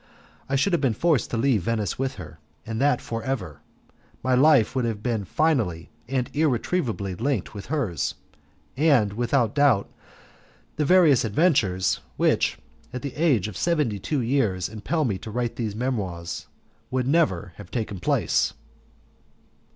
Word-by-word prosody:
I 135 - +1
should 175 +8 +2
have 170 - +2
been 130 -6 +1
forced 160 -1 +1
to 120 - -2
leave 120 -3 +2
Venice 105 +1 -2
with 135 0 -1
her, 80 -4 -10 0.3
and 110 +1 -3
that 140 -3 +3
for 115 0 -4
ever. 105 - -4 0.6
My 130 - +1
life 130 -2 +5
would 130 - +1
have 110 -3 -3
been 115 -5 -1
finally 110 - 0 0.2
and 130 -2 0
irretrievably 130 - 0
linked 135 +5 -1
with 100 -2 -8
hers, 120 - -1 0.6
and, 130 -9 +3
without 120 +2 +1
doubt, 140 -9 +3 0.9
the 150 - +1
various 160 -6 +5
adventures 110 - +2 0.2
which - - +2 0.3
at 125 - -6
the 140 - -4
age 140 - +2
of 105 - -8
seventy 150 - 0
two 140 +8 -1
years 115 -8 0
impel 130 +9 -1
me 100 -6 -1
to - - -8
write 120 +1 -2
these 110 -4 -3
Memoirs, 100 -9 -3 0.4
would 130 -1 -1
never 100 - +1
have 105 - -11
taken 110 -5 -3
place. 90 - +1
120 Hz, 150 wpm, -25 LUFS, 105-140 Hz, 0.9 s, life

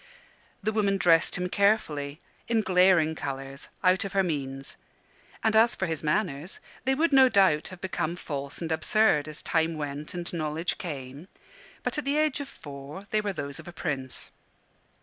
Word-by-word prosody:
The 215 - +1
woman 200 -2 +2
dressed 165 -3 +4
him 180 0 -1
carefully, 165 -8 +1 0.3
in 230 -1 +2
glaring 180 -4 +4
colours, 135 -2 -6
out 185 0 +4
of 195 - -5
her 195 -1 +3
means: 135 -5 -3 0.7
and 220 -1 +3
as 225 +2 +5
for 190 - -1
his 160 -3 -3
manners, 155 0 -1 0.3
they 265 0 +3
would 315 +1 +2
no 265 -1 +8
doubt 190 -9 +4
have 185 -1 -10
become 175 -3 -2
false 140 -4 -5
and 165 - -3
absurd, 160 -3 +3
as 155 -1 -6
time 160 0 +1
went 145 +2 -5
and 175 0 -5
knowledge 160 +1 -2
came; 140 -1 -6 0.6
but - - -1
at 300 - -5
the 280 +2 +1
age 305 -2 +2
of 280 -1 -5
four 145 +6 -9
they 215 - +2
were 205 -1 -1
those 140 -6 -5
of - - -11
a - - -6
prince. 130 -6 -4
170 Hz, 175 wpm, -28 LUFS, 145-200 Hz, 0.7 s, no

